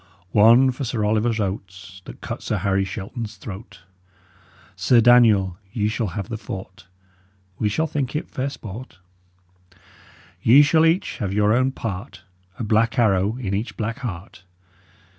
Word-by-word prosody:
One 120 Hz, +5 st, +6 dB
for 130 Hz, +2 st, -6 dB
Sir 115 Hz, -4 st, -1 dB
Oliver 110 Hz, +2 st, +1 dB
Oates, 95 Hz, -1 st, -7 dB
That -, -, -11 dB
cut -, -, -6 dB
Sir -, -, -2 dB
Harry 95 Hz, 0 st, 0 dB
Shelton's 105 Hz, +3 st, -6 dB
throat. 100 Hz, -1 st, -10 dB, 0.9 s
Sir 125 Hz, -, +3 dB
Daniel, 110 Hz, -6 st, +5 dB, 0.2 s
ye 105 Hz, -2 st, 0 dB
shull 110 Hz, 0 st, -2 dB
have 100 Hz, -, -4 dB
the 115 Hz, -2 st, -5 dB
fourt; 95 Hz, -2 st, -9 dB, 0.7 s
We 105 Hz, -, +1 dB
shall 160 Hz, +10 st, 0 dB
think 140 Hz, -3 st, -3 dB
it 150 Hz, -, -3 dB
fair 130 Hz, +2 st, -3 dB
sport. 115 Hz, -4 st, -9 dB, 1.4 s
Ye 135 Hz, +6 st, +7 dB
shull 160 Hz, +2 st, +4 dB
each 165 Hz, +4 st, 0 dB
have 100 Hz, -2 st, -2 dB
your 105 Hz, +1 st, +3 dB
own 130 Hz, +2 st, +2 dB
part, 100 Hz, -7 st, -6 dB, 0.3 s
A -, -, -4 dB
blak 115 Hz, +2 st, +1 dB
arrow 105 Hz, -1 st, +2 dB
in 100 Hz, -7 st, -4 dB
each 105 Hz, +4 st, -3 dB
blak 115 Hz, +3 st, -3 dB
heart. 95 Hz, -7 st, -7 dB
110 Hz, 150 wpm, -22 LUFS, 95-120 Hz, 1.4 s, Ye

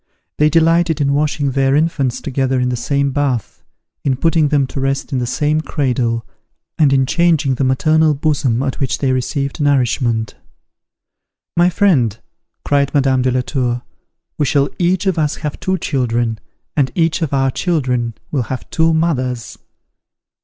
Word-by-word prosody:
They 150 Hz, 0 st, +5 dB
delighted 165 Hz, 0 st, +3 dB
in 140 Hz, -1 st, +1 dB
washing 145 Hz, -1 st, 0 dB
their 135 Hz, +1 st, +2 dB
infants 145 Hz, -5 st, 0 dB
together 135 Hz, -1 st, -1 dB
in 125 Hz, 0 st, 0 dB
the 125 Hz, -, -1 dB
same 140 Hz, +3 st, 0 dB
bath, 135 Hz, -5 st, -2 dB, 0.4 s
in 135 Hz, -2 st, +1 dB
putting 165 Hz, +1 st, +2 dB
them 145 Hz, -2 st, +2 dB
to 135 Hz, -, -6 dB
rest 135 Hz, +2 st, -2 dB
in 130 Hz, -, +1 dB
the 120 Hz, -, -2 dB
same 150 Hz, +4 st, 0 dB
cradle, 125 Hz, -7 st, -1 dB, 0.5 s
and 150 Hz, -3 st, +3 dB
in 135 Hz, -1 st, +3 dB
changing 160 Hz, -2 st, +2 dB
the 130 Hz, -, -1 dB
maternal 155 Hz, +4 st, +3 dB
bosom 140 Hz, -4 st, 0 dB
at 135 Hz, +1 st, -3 dB
which 135 Hz, -3 st, -1 dB
they 135 Hz, -2 st, 0 dB
received 140 Hz, +3 st, -2 dB
nourishment. 120 Hz, -5 st, +1 dB, 1.2 s
"My 175 Hz, +1 st, +4 dB
friend," 145 Hz, -, +2 dB, 0.5 s
cried 140 Hz, -1 st, +1 dB
Madame 135 Hz, -2 st, +3 dB
de 130 Hz, -, +1 dB
la 125 Hz, 0 st, +1 dB
Tour, 125 Hz, -2 st, -2 dB, 0.6 s
"we 145 Hz, -, +2 dB
shall 140 Hz, 0 st, +2 dB
each 180 Hz, +2 st, +1 dB
of 185 Hz, -4 st, +1 dB
us 150 Hz, -1 st, 0 dB
have 150 Hz, -3 st, -5 dB
two 190 Hz, 0 st, -1 dB
children, 120 Hz, -7 st, -1 dB, 0.4 s
and 135 Hz, -4 st, +1 dB
each 165 Hz, -1 st, +1 dB
of 160 Hz, -, -1 dB
our 135 Hz, -1 st, +1 dB
children 125 Hz, -9 st, -1 dB, 0.2 s
will 135 Hz, -5 st, 0 dB
have 130 Hz, -, -5 dB
two 165 Hz, 0 st, +2 dB
mothers." 130 Hz, -8 st, -1 dB
140 Hz, 160 wpm, -17 LUFS, 130-155 Hz, 1.2 s, They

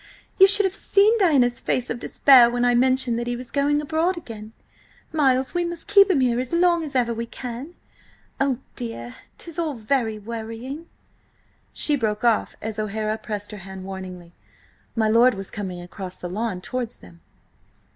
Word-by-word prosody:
you 385 Hz, -, +9 dB
should 405 Hz, +1 st, +7 dB
have 380 Hz, -, 0 dB
seen 405 Hz, +2 st, +3 dB
Diana's 265 Hz, -, +3 dB
face 245 Hz, -, -2 dB
of 240 Hz, -, -4 dB
despair 255 Hz, -2 st, +6 dB
when 245 Hz, 0 st, 0 dB
I 245 Hz, -, +3 dB
mentioned 255 Hz, -1 st, +2 dB
that 240 Hz, -, -4 dB
he 245 Hz, -, -1 dB
was 240 Hz, -1 st, -9 dB
going 290 Hz, +2 st, +1 dB
abroad 320 Hz, +4 st, 0 dB
again. 220 Hz, -8 st, -9 dB, 0.6 s
Miles, 265 Hz, -4 st, +2 dB
we 350 Hz, 0 st, 0 dB
must 345 Hz, +1 st, -5 dB
keep 400 Hz, -1 st, +6 dB
him 315 Hz, -8 st, +3 dB
here 245 Hz, -1 st, +1 dB
as 255 Hz, -, -4 dB
long 340 Hz, -1 st, +3 dB
as 290 Hz, -3 st, -7 dB
ever 240 Hz, -2 st, +1 dB
we 230 Hz, +1 st, -5 dB
can! 250 Hz, +8 st, -7 dB, 0.6 s
Oh, 270 Hz, -2 st, +1 dB, 0.2 s
dear! 115 Hz, 0 st, -5 dB, 0.2 s
'tis 335 Hz, -1 st, -7 dB
all 315 Hz, -4 st, -2 dB
very 225 Hz, -1 st, -1 dB
worrying." 230 Hz, +8 st, -7 dB, 0.8 s
She 300 Hz, -, +2 dB
broke 220 Hz, -4 st, -2 dB
off 230 Hz, -3 st, +1 dB
as 220 Hz, 0 st, -4 dB
O'Hara 215 Hz, +1 st, -2 dB
pressed 210 Hz, -1 st, -6 dB
her 210 Hz, -, -8 dB
hand 190 Hz, 0 st, -9 dB
warningly. 185 Hz, -2 st, -8 dB, 0.6 s
My 220 Hz, -2 st, +2 dB
lord 230 Hz, +2 st, +4 dB
was 195 Hz, -1 st, -7 dB
coming 190 Hz, -4 st, -5 dB
across 180 Hz, +1 st, -8 dB
the 180 Hz, -, -6 dB
lawn 195 Hz, 0 st, -3 dB
towards 245 Hz, +3 st, -5 dB
them. 85 Hz, -2 st, -17 dB
240 Hz, 175 wpm, -23 LUFS, 215-290 Hz, 0.8 s, you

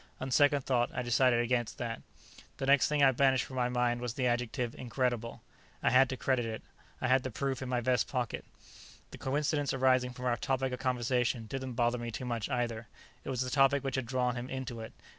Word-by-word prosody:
On 130 Hz, 0 st, -4 dB
second 145 Hz, +1 st, +4 dB
thought, 120 Hz, -2 st, +1 dB
I -, -, -1 dB
decided 120 Hz, 0 st, +3 dB
against 120 Hz, -1 st, -1 dB
that. 115 Hz, -2 st, -4 dB, 0.6 s
The 135 Hz, -, -3 dB
next 140 Hz, 0 st, +5 dB
thing 150 Hz, -1 st, +2 dB
I 135 Hz, -, +7 dB
banished 130 Hz, 0 st, +3 dB
from 130 Hz, -, -8 dB
my 125 Hz, -1 st, +1 dB
mind 120 Hz, -1 st, 0 dB
was 120 Hz, -2 st, -4 dB
the 130 Hz, -, -1 dB
adjective 120 Hz, 0 st, -1 dB
"incredible." 120 Hz, -2 st, -2 dB, 0.4 s
I -, -, +3 dB
had 130 Hz, 0 st, +5 dB
to 130 Hz, -, -3 dB
credit 130 Hz, -2 st, +1 dB
it; 110 Hz, -1 st, -5 dB, 0.4 s
I 130 Hz, -, -1 dB
had 130 Hz, +1 st, +4 dB
the 130 Hz, -, -4 dB
proof 135 Hz, +2 st, -3 dB
in 130 Hz, -, -4 dB
my 125 Hz, -1 st, 0 dB
vest 125 Hz, +1 st, +1 dB
pocket. 125 Hz, -4 st, -3 dB, 0.7 s
The -, -, -10 dB
coincidence 145 Hz, +1 st, 0 dB
arising 130 Hz, -1 st, +3 dB
from 125 Hz, 0 st, -7 dB
our 120 Hz, -1 st, +1 dB
topic 130 Hz, +1 st, -1 dB
of 125 Hz, -, -4 dB
conversation 125 Hz, -2 st, 0 dB
didn't 130 Hz, +2 st, -5 dB
bother 120 Hz, +1 st, +1 dB
me 120 Hz, 0 st, -4 dB
too 115 Hz, +3 st, -5 dB
much, 120 Hz, -2 st, -2 dB
either. 120 Hz, -3 st, -2 dB, 0.4 s
It -, -, -7 dB
was 130 Hz, -2 st, -1 dB
the 130 Hz, 0 st, -2 dB
topic 140 Hz, 0 st, +4 dB
which 135 Hz, -2 st, -2 dB
had 130 Hz, -3 st, -2 dB
drawn 125 Hz, -1 st, 0 dB
him 125 Hz, +1 st, -5 dB
into 130 Hz, -3 st, -5 dB
it. 110 Hz, -, -7 dB
125 Hz, 220 wpm, -31 LUFS, 120-130 Hz, 0.7 s, I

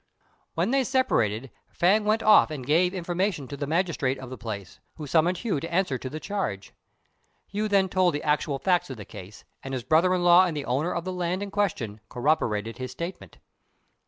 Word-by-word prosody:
When 175 Hz, +7 st, 0 dB
they 270 Hz, 0 st, +3 dB
separated, 135 Hz, -, 0 dB, 0.2 s
Fêng 205 Hz, +5 st, +3 dB
went 215 Hz, +1 st, +2 dB
off 215 Hz, -5 st, +6 dB
and 145 Hz, -5 st, -6 dB
gave 170 Hz, +6 st, +3 dB
information 180 Hz, -4 st, -2 dB
to 140 Hz, -, -5 dB
the 140 Hz, 0 st, -4 dB
magistrate 160 Hz, -5 st, 0 dB
of 130 Hz, -1 st, -9 dB
the -, -, -5 dB
place, 100 Hz, -5 st, -7 dB, 0.2 s
who 155 Hz, -, -7 dB
summoned 165 Hz, +5 st, +2 dB
Hu 200 Hz, -6 st, -1 dB
to 165 Hz, +4 st, -6 dB
answer 170 Hz, -7 st, 0 dB
to 130 Hz, -, -5 dB
the 155 Hz, -, -6 dB
charge. 155 Hz, -, -4 dB, 0.8 s
Hu 210 Hz, +2 st, -1 dB
then 200 Hz, -2 st, +3 dB
told 185 Hz, -3 st, +2 dB
the 145 Hz, -, -4 dB
actual 150 Hz, -1 st, 0 dB
facts 180 Hz, +2 st, +1 dB
of 130 Hz, -, -6 dB
the 105 Hz, -, -9 dB
case, 100 Hz, +3 st, -11 dB, 0.2 s
and 135 Hz, 0 st, -5 dB
his 125 Hz, -, -4 dB
brother 165 Hz, +7 st, +3 dB
in 180 Hz, -, -1 dB
law 175 Hz, +1 st, +7 dB
and 160 Hz, -3 st, -3 dB
the 140 Hz, -, -4 dB
owner 145 Hz, +8 st, 0 dB
of 170 Hz, -, -2 dB
the 185 Hz, -, -3 dB
land 180 Hz, +2 st, -2 dB
in 200 Hz, -, -6 dB
question 125 Hz, -, -2 dB
corroborated 120 Hz, -5 st, 0 dB
his 130 Hz, 0 st, -4 dB
statement. 170 Hz, +8 st, -7 dB
165 Hz, 205 wpm, -26 LUFS, 130-185 Hz, 0.8 s, law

